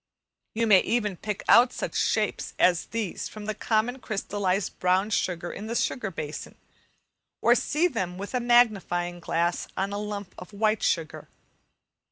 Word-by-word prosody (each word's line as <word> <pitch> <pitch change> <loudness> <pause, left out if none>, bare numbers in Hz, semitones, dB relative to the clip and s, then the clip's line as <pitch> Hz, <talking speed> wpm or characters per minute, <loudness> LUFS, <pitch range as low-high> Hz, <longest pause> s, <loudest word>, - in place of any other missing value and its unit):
You 230 +1 +1
may 205 -4 +7
even 210 -4 0
pick 210 +3 -5
out 245 +1 +7
such - - -4
shapes - - 0
as 175 -2 +3
these 225 -5 -4
from 215 -1 -9
the 215 - -2
common 225 +4 0
crystallized 200 -4 -2
brown 185 +3 +2
sugar 175 -4 -1
in 210 - -7
the 230 - -3
sugar 230 -3 -1
basin, 155 -4 -6 0.8
or - - +5
see 330 +4 +1
them 185 - -3
with 200 +5 -7
a 250 - +1
magnifying 205 -8 +2
glass 170 0 -1
on 195 +1 -1
a 205 - -2
lump 205 -2 -5
of 180 +3 -11
white 215 +1 +1
sugar. 165 -3 -1
205 Hz, 160 wpm, -26 LUFS, 180-225 Hz, 0.8 s, may